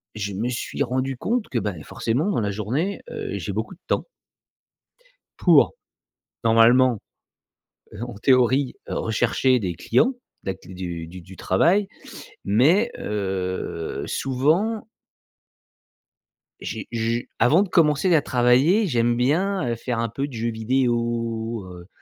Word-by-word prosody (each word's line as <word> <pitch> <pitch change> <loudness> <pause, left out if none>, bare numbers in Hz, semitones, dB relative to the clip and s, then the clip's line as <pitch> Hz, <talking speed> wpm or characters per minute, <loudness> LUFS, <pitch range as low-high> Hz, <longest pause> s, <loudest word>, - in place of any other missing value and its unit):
je 100 -1 -4
me 110 +6 -2
suis 125 +3 -4
rendu 130 0 -1
compte 235 - -1
que, 120 - 0
bah, 105 -2 -2
forcément 130 - -1
dans 155 - 0
la 100 -1 -1
journée, 125 - -2
heu, - - -4
j'ai - - -4
beaucoup - - -4
de - - -34
temps - - 0 1.3
pour - - +5 0.7
normalement, 115 +2 +5 0.9
heu, 105 - -10
en 120 -2 -8
théorie, 130 +3 +3
heu, - - -3
rechercher 120 +3 +2
des 95 -6 -3
clients, 245 - +2 0.3
de - - -1
l'ac - - -14
du 90 -3 -6
du 90 +2 -11
travail 170 - +2 0.6
mais, 155 - +3
heu, 95 -5 -3
souvent 160 - 0 1.8
j'ai - - -5
je 115 0 -1 0.2
avant 155 +10 +5
de 200 - -6
commencer 165 +1 +3
à 155 - +4
travailler, 130 - +3
j'aime 120 -5 +2
bien, 160 +7 +1
heu, 115 - 0
faire 120 +1 -3
un 115 0 -1
peu 135 +6 -3
de 140 - -12
jeux 115 0 -2
vidéo, 115 -2 -1
heu, 90 0 -11
120 Hz, 135 wpm, -23 LUFS, 110-140 Hz, 1.8 s, pour